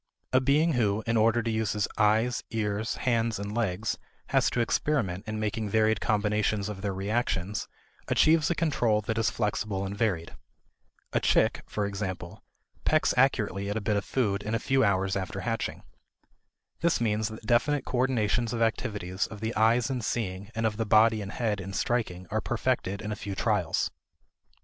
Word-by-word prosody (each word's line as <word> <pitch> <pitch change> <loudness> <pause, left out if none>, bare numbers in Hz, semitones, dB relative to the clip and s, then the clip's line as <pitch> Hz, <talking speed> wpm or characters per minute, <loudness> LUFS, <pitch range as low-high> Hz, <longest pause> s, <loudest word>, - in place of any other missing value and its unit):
A 130 - +5
being 150 +5 +3
who, 110 -3 +1
in 115 - 0
order 115 +1 +3
to 115 - -1
use 110 -2 0
his 105 -2 0
eyes, 110 +3 +2
ears, 110 -1 -1
hands, 115 -2 0
and 100 +1 -5
legs, 105 -3 -1 0.3
has - - +3
to - - -2
experiment 115 -6 0
in 110 0 -3
making 110 0 -2
varied 110 0 +2
combinations 105 -1 +1
of 100 -2 -6
their 100 0 -1
reactions, 100 0 -1 0.4
achieves 155 -1 +4
a 170 - +1
control 120 -10 +1
that 110 +2 -2
is 110 -3 +2
flexible 100 -1 -2
and 100 +1 -4
varied. 95 -7 -1 0.8
A - - +3
chick, - - +2
for 105 - -2
example, 95 -3 -5 0.4
pecks 155 0 +3
accurately 105 -7 +2
at 105 - -1
a - - 0
bit 105 0 0
of 100 - 0
food 105 -5 0
in 110 +2 -2
a - - 0
few 135 +2 +2
hours 95 -2 +1
after 95 0 -3
hatching. 115 +3 -3 1.0
This 170 0 +2
means 110 -2 +1
that 110 0 -9
definite 135 +5 +2
coordinations 120 -2 +1
of 115 - -2
activities 105 -4 -1
of 105 -1 -9
the 110 +2 -2
eyes 115 +3 +3
in 125 -2 -2
seeing 100 -3 -3
and 115 0 0
of 105 -1 0
the 115 - 0
body 110 +1 +5
and 100 0 -6
head 110 -4 -1
in 95 +1 -7
striking 95 -5 -1
are - - 0
perfected 100 +2 -1
in 105 - -4
a - - -2
few 100 0 -5
trials. - - 0
110 Hz, 180 wpm, -28 LUFS, 100-115 Hz, 1.0 s, A